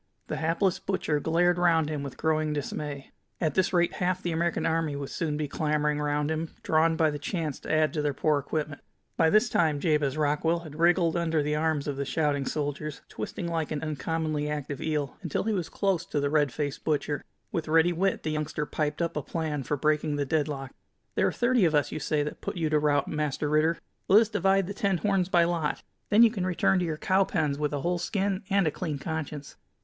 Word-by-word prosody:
The - - -2
hapless 170 +4 +1
butcher 160 -6 -1
glared 175 +3 +2
round 165 -3 +3
him 150 -2 -3
with 140 -2 -7
growing 155 -1 +1
dismay. 145 -1 -5 0.3
At 155 -4 0
this 190 +2 +2
rate 175 -1 +2
half 185 +1 -1
the 175 - -1
American 170 +1 0
army 160 -2 0
would 140 -1 -5
soon 155 -4 -2
be 150 -1 -2
clamoring 150 0 0
round 150 +1 0
him, 160 +1 -3
drawn 160 +1 +3
by 160 -1 +3
the 145 - -5
chance 155 -1 -3
to - - -6
add 155 0 +3
to 155 - -1
their 145 -1 +1
poor 150 0 +2
equipment. 150 +1 -4 0.3
By 160 - +4
this 215 +7 +4
time 160 -9 +2
Jabez 150 -3 +1
Rockwell 155 +3 +1
had 155 -2 -10
wriggled 170 0 +3
under 165 -3 +1
the 150 +1 0
arms 155 -2 0
of 140 -2 -2
the 140 - -2
shouting 145 -2 0
soldiers, 150 0 -3
twisting 110 - -5
like 165 -2 -1
an 150 -1 -3
uncommonly 155 -1 -2
active 145 -2 -4
eel, 150 -3 -2
until 170 -6 -2
he 220 +1 0
was 180 -5 -2
close 195 -4 0
to 150 - -1
the 145 0 0
red 150 -3 +3
faced 145 +1 -3
butcher. 145 -2 -1 0.3
With 165 -2 -2
ready 165 +2 +4
wit 190 +3 0
the 155 - -1
youngster 150 0 -2
piped 150 +2 -1
up 170 - -2
a 150 - -1
plan 155 -1 -3
for 145 +3 -2
breaking 150 +1 +1
the 145 -1 -1
deadlock: 140 -2 -1 0.4
"There - - +2
are - - +1
thirty 240 -2 +2
of 160 -3 +3
us, 145 -2 +2
you 155 - -3
say, 150 0 0
that 150 - -6
put - - -4
you 160 -2 0
to 155 - +4
rout, 145 -1 +2
Master 150 -1 -1
Ritter. 155 +3 +2 0.3
Let 205 +3 +7
us 225 - 0
divide 195 -2 +2
the 200 - -5
ten 200 -4 0
horns 195 -1 +1
by 175 -2 +5
lot. 170 -3 -1 0.3
Then 215 +3 +7
you 230 - +6
can 200 -5 -3
return 185 +1 +2
to 180 - 0
your 160 -2 -2
cow 190 +4 +3
pens 150 -6 -1
with 150 -1 0
a 145 -2 -2
whole 175 +2 0
skin 195 +1 -1
and 195 -2 +3
a 155 - +2
clean 155 -2 -3
conscience." 150 -1 -5
155 Hz, 225 wpm, -28 LUFS, 150-170 Hz, 0.4 s, Let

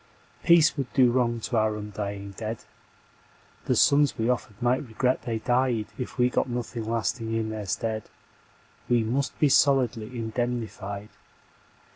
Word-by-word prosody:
Peace 170 -2 +5
would 135 -3 -3
do 125 -3 +5
wrong 120 -2 +1
to 120 - -3
our 110 -1 +2
undying 100 -1 -5
dead, 110 +3 -6 1.0
The - - +1
sons 145 0 +4
we 115 +2 0
offered 110 -4 -4
might 125 +3 +1
regret 125 +3 0
they 115 -2 -2
died 120 -1 0
If 125 0 -6
we 125 -1 +4
got 125 - 0
nothing 120 -2 -4
lasting 115 0 -1
in 110 -1 -1
their 105 -2 -5
stead. 110 +2 -2 0.8
We 120 -2 +3
must 130 +4 -1
be 150 - +5
solidly 130 -5 +3
indemnified. 110 -3 -3
115 Hz, 145 wpm, -26 LUFS, 110-125 Hz, 1.0 s, Peace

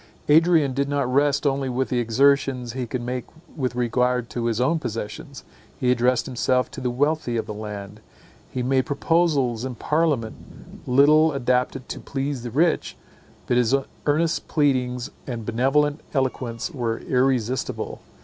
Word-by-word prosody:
Adrian 160 -3 +5
did 140 +2 -1
not 140 -3 0
rest 145 +1 +2
only 135 -1 +1
with 130 +1 -1
the 125 - 0
exertions 125 +1 +2
he 125 -1 -3
could 120 +1 -4
make 125 0 -3 0.3
with 130 -4 -2
regard 125 0 0
to 120 -1 -3
his 115 -1 0
own 150 +6 +2
possessions. 120 +3 -6 0.4
He 125 -1 +2
addressed 125 0 +2
himself 125 0 0
to 135 - -7
the 125 - 0
wealthy 140 -1 0
of 110 - -2
the 105 - -6
land; 105 -1 -7 0.5
he 125 - -3
made 130 +2 +1
proposals 140 -6 +1
in 130 -1 -4
parliament 150 -5 -2
little 150 +4 +5
adapted 125 0 0
to - - -5
please 135 -1 -3
the 120 - -5
rich; 155 +7 +1 0.5
but 120 - +1
his 125 +1 +3 0.3
earnest 160 +3 +1
pleadings 125 -5 0 0.2
and 120 -4 -5
benevolent 135 +6 +1
eloquence 130 +1 -2
were 120 -6 -2
irresistible. 130 -1 -1
130 Hz, 150 wpm, -23 LUFS, 120-140 Hz, 0.5 s, Adrian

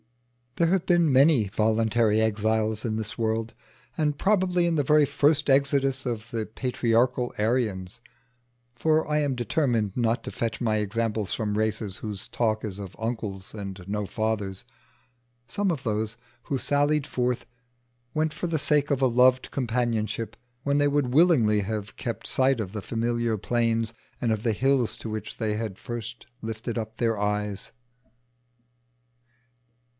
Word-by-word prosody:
There 170 - +3
have 185 -1 +1
been 170 -5 +3
many 135 -5 +5
voluntary 110 +1 +2
exiles 110 0 +1
in 110 -2 -1
the 110 -1 -3
world, 115 0 -1 0.4
and 150 -2 +1
probably 185 -3 +2
in 170 -1 +1
the 145 - +2
very 150 +1 +5
first 145 +2 +2
exodus 135 -1 +2
of 115 -2 -3
the 115 -2 -2
patriarchal 120 +1 0
Aryans 110 -2 -1 0.7
for 155 +5 +2
I 150 0 +1
am 145 -3 0
determined 120 - 0
not 115 -1 +1
to - - -5
fetch 115 -1 -3
my 110 -3 +1
examples 105 0 -1
from 105 -2 -1
races 110 -2 0
whose 105 -3 -6
talk 110 -2 0
is 100 -2 -6
of 95 -3 -8
uncles 110 -4 -4
and 100 -3 -6
no 105 +1 -2
fathers 110 -1 -2 0.8
some 200 +10 -1
of 140 -6 -3
those 110 0 -2 0.3
who 140 - -2
sallied 145 +2 +1
forth 125 -1 -1 0.7
went 155 0 +1
for 175 - -3
the 165 -2 0
sake 145 0 +2
of 140 -2 +1
a - - +6
loved 125 +1 +4
companionship, 115 -3 -1 0.3
when 140 0 +2
they 145 - +4
would 140 -3 +1
willingly 130 -10 +5
have 105 0 -4
kept - - -4
sight 130 -1 +3
of 100 -4 -3
the 105 - -4
familiar 115 +1 -1
plains, 115 +1 0 0.3
and 115 - 0
of 110 -2 0
the 115 - +2
hills 130 +1 +1
to 115 - -6
which 110 0 -5
they 110 -2 0
had 105 -3 -3
first 120 -1 -6 0.2
lifted 115 +2 -4
up 110 0 -5
their 115 -2 +1
eyes. 105 -1 -2
115 Hz, 155 wpm, -26 LUFS, 110-135 Hz, 0.8 s, a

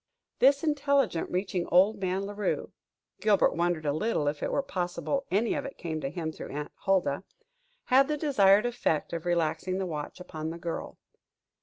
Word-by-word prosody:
This 280 +3 +5
intelligence 280 - +1
reaching 180 -1 -1
old 195 +5 +4
man 190 +1 -1
La 205 - -6
Rue 205 0 -2 0.5
Gilbert 210 -2 +3
wondered 170 -2 0
a 145 - +1
little 155 -3 0
if 145 0 -1
it - - -1
were 280 - +1
possible 195 +6 -2
any 215 +4 +1
of - - -2
it 275 - -8
came 160 -2 -4
to 135 - -2
him 160 0 -4
through - - -8
Aunt 145 +1 -5
Huldah 190 -6 0 0.6
had 270 +2 +4
the 300 0 -1
desired 210 -9 +4
effect 235 -12 -1
of 170 +1 -4
relaxing 175 +2 0
the 190 - -1
watch 155 -1 -5
upon 160 -3 -5
the 165 - -6
girl. 170 -1 -5
185 Hz, 180 wpm, -28 LUFS, 165-230 Hz, 0.6 s, This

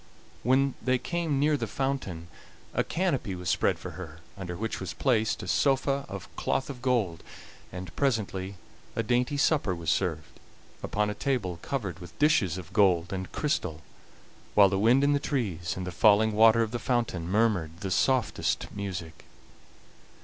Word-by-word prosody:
When 130 +2 +3
they 130 0 +2
came 160 +1 -1
near 150 +1 +3
the - - -2
fountain 130 -12 -3 0.5
a - - +2
canopy 145 - -1
was 90 -1 -4
spread - - +2
for - - -7
her, 80 -3 -9 0.2
under 90 -3 -6
which 110 +3 -3
was 95 - -5
placed 110 -5 +1
a - - -7
sofa 140 0 +2
of 100 -3 -7
cloth 135 - -1
of 125 -3 -10
gold, 115 -10 0 0.5
and 90 -1 -8
presently 100 -7 -1 0.4
a 115 - 0
dainty 125 +5 +1
supper 140 - +2
was 85 -2 -1
served, 80 -3 -2 0.4
upon 105 0 0
a - - -3
table 105 -10 -2
covered 100 - -3
with 90 -2 -12
dishes 145 - +3
of 90 0 -9
gold 95 -4 +3
and 95 -1 -4
crystal, 90 - -2 0.7
while 100 -2 +7
the 95 0 0
wind 120 +6 +4
in 145 0 +4
the 145 - +2
trees 90 - -2
and 95 - -4
the 90 - -4
falling 110 +3 +5
water 110 +2 +6
of 110 - -4
the 120 - -2
fountain 115 -10 -1
murmured 95 -6 +1
the 95 - -3
softest 130 +4 +1
music. 90 -5 -6
105 Hz, 165 wpm, -28 LUFS, 90-130 Hz, 0.7 s, while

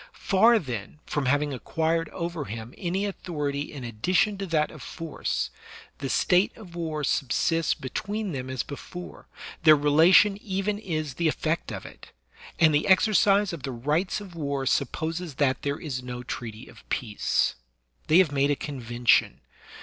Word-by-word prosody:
Far, 225 +5 +4
then, 125 - -5
from 145 -3 -2
having 145 +2 +1
acquired 160 +5 -1
over 170 -4 -4
him 115 +1 -7
any 185 +3 -2
authority 150 -7 -3
in 140 -4 -8
addition 180 - +1
to 195 - -3
that 155 -3 +1
of 155 - -11
force, 165 -3 -3 0.5
the 135 -1 -3
state 180 +8 +3
of 195 -7 -12
war 160 -3 -3
subsists 165 +6 +1
between 200 +9 -4
them 130 -3 -5
as 130 -1 -2
before, 175 +5 -9 0.3
their 155 -2 +8
relation 160 +8 +5
even 200 +1 -2
is 155 -8 -3
the 170 +4 0
effect 160 +1 -1
of - - -6
it; - - -12 0.5
and 160 -2 +5
the 150 - +2
exercise 200 0 +4
of 165 - -6
the 135 - -4
rights 150 - 0
of 200 -4 -10
war 140 -4 -2
supposes 160 +4 -1
that 135 -2 +1
there 140 0 -2
is 135 -6 -4
no 125 0 -6
treaty 115 -2 -6
of - - -16
peace. 110 -5 0 0.5
They 155 - +5
have 185 -5 +5
made 140 0 +2
a 145 - +3
convention. 120 -5 +1
155 Hz, 160 wpm, -26 LUFS, 135-180 Hz, 0.5 s, their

